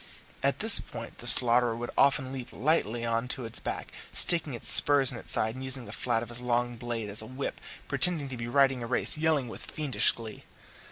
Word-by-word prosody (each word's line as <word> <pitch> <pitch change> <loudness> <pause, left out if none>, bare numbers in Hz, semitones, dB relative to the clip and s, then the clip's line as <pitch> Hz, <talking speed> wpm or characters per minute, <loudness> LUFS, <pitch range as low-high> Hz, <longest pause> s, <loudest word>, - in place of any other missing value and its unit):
At - - -2
this - - +8
point - - -11
the - - -6
slaughterer 120 -1 +4
would 120 +1 -7
often 135 -1 +1
leap 130 -2 -8
lightly 120 -6 -2
on 115 +1 -3
to 130 -1 -6
its 115 - -7
back, - - -7 0.2
stick 165 -2 +1
his 125 -5 -3
spurs 140 -3 +6
in 125 - -9
its - - +1
sides, 110 +1 +5
and, 130 +2 -10
using 130 -1 -2
the 100 - -11
flat 115 0 -3
of 120 - -11
his 120 +1 -7
long 120 0 -2
knife 120 -3 -5
as 100 +1 -1
a 110 - -11
whip, 130 +3 -7 0.3
pretend 150 +1 +1
to - - -6
be 120 -1 -7
riding 135 0 +1
a 115 - -7
race, 125 - +2
yelling 155 -4 -1
with 115 - -10
fiendish 150 -4 0
glee. 115 -2 -11
125 Hz, 220 wpm, -26 LUFS, 115-135 Hz, 0.3 s, this